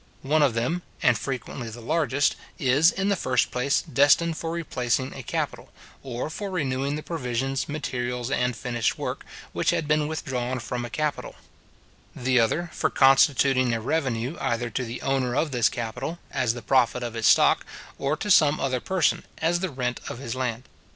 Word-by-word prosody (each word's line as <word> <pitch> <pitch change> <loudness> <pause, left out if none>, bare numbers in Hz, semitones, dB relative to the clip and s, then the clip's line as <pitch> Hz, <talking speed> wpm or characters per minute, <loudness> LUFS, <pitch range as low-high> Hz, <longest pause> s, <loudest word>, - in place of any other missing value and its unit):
One 150 +3 +2
of 135 -6 +3
them, 125 +10 0 0.2
and 125 - +5
frequently 125 -1 -5
the 115 +2 -9
largest, 145 +1 +1 0.2
is, 140 +5 +4
in 195 +1 -1
the 200 - +3
first 130 -8 +1
place, 125 +3 +1
destined 145 +5 +3
for 165 - -4
replacing 130 -6 -1
a 135 - -7
capital, - - -4 0.3
or 130 +3 -4
for 205 +4 -5
renewing 140 -5 -1
the 150 - -5
provisions, 135 -4 -2
materials, 125 -4 -3
and 125 -3 +1
finished 120 -3 -1
work, - - -4 0.3
which - - 0
had 155 - 0
been 150 0 +2
withdrawn 130 -5 -3
from 120 +1 -4
a - - -7
capital; 150 +5 -3 0.8
the 125 0 +2
other 155 +9 +1
for - - 0
constituting 135 -2 +4
a - - -2
revenue 130 +2 -1
either 115 0 -1
to 130 - -2
the 120 0 -6
owner 130 -2 0
of 150 +1 +1
this 120 -3 +3
capital, 120 +7 -4
as 125 -3 0
the 120 - -8
profit 125 0 +2
of 120 -2 -4
his 115 -1 +1
stock, - - +5 0.4
or 140 +3 0
to 205 - -2
some 155 -4 +5
other 130 -2 0
person, 185 +6 +1
as 170 +2 +1
the 190 +1 -2
rent 125 -4 -3
of - - -5
his 120 -3 -5
land. 125 -2 -2
130 Hz, 180 wpm, -25 LUFS, 120-150 Hz, 0.8 s, and